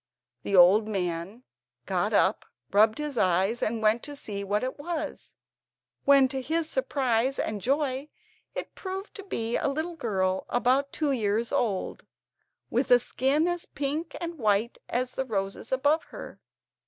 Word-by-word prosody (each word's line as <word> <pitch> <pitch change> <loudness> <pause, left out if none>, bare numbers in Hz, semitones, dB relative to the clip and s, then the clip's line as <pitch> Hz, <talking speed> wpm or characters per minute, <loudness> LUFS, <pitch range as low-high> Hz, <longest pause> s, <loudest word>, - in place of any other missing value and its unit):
The 200 - -1
old 190 +4 +7
man 185 +2 -3 0.4
got - - 0
up, - - +2 0.3
rubbed 215 +2 +4
his 295 -4 -3
eyes, 190 +6 +2
and 220 0 -1
went 215 +2 +4
to 290 0 -7
see 200 -7 -5
what 205 +3 0
it 260 +2 -4
was, 315 -1 -5 0.7
when, 275 -1 +6
to 265 0 -3
his 320 +4 0
surprise 270 - 0
and 210 -2 -2
joy, 275 +2 0 0.5
it - - -5
proved 385 +1 -6
to 400 - -8
be 230 - -1
a - - 0
little 315 +5 -2
girl 190 -8 -1
about 260 +3 +2
two 300 -3 0
years 225 -2 0
old, 205 -6 -1 0.6
with 250 +4 +1
a 245 - +8
skin 270 +6 +1
as 350 -1 -2
pink 295 +4 -3
and 340 -2 -5
white 215 +1 +1
as 255 +1 -1
the 265 - -2
roses 195 -1 -3
above 285 +5 +2
her. - - -10
255 Hz, 155 wpm, -27 LUFS, 215-290 Hz, 0.7 s, a